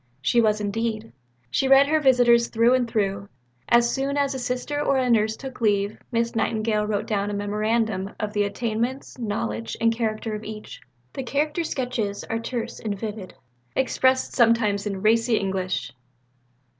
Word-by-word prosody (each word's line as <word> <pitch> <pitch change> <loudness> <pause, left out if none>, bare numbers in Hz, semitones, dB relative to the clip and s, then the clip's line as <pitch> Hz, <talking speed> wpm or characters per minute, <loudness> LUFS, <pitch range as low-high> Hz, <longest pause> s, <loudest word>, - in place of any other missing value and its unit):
She 185 - +3
was 215 -1 +2
indeed. 220 +2 -3 0.4
She 265 - +1
read 270 +1 +7
her 310 +2 +2
visitors 245 -4 +4
through 230 +2 +3
and 250 -2 +1
through. 200 -2 -1 0.4
As 235 0 +4
soon 275 +1 -1
as 280 -1 +1
a 265 - -4
Sister 250 +4 -2
or 275 -2 +2
a 255 -2 +1
Nurse 220 -1 +2
took 265 -3 -9
leave, 205 -1 +1
Miss 230 0 0
Nightingale 215 -1 0
wrote 210 0 -1
down 205 -3 -1
a 205 - -3
memorandum 210 -1 -1
of 210 -1 -3
the 205 -1 +2
attainments, 235 +6 -3
knowledge, 115 - -3
and 230 0 +3
character 220 -1 -2
of 210 0 -5
each. 215 0 -8 0.3
The - - -4
character 300 +6 -1
sketches 240 -9 -3
are 225 - -3
terse 230 0 -4
and 210 -2 -3
vivid, 210 -3 -6 0.4
expressed 260 0 +2
sometimes 225 -4 +3
in 195 -1 -4
racy 230 +1 +3
English. 190 -8 -2
225 Hz, 165 wpm, -24 LUFS, 210-250 Hz, 0.4 s, read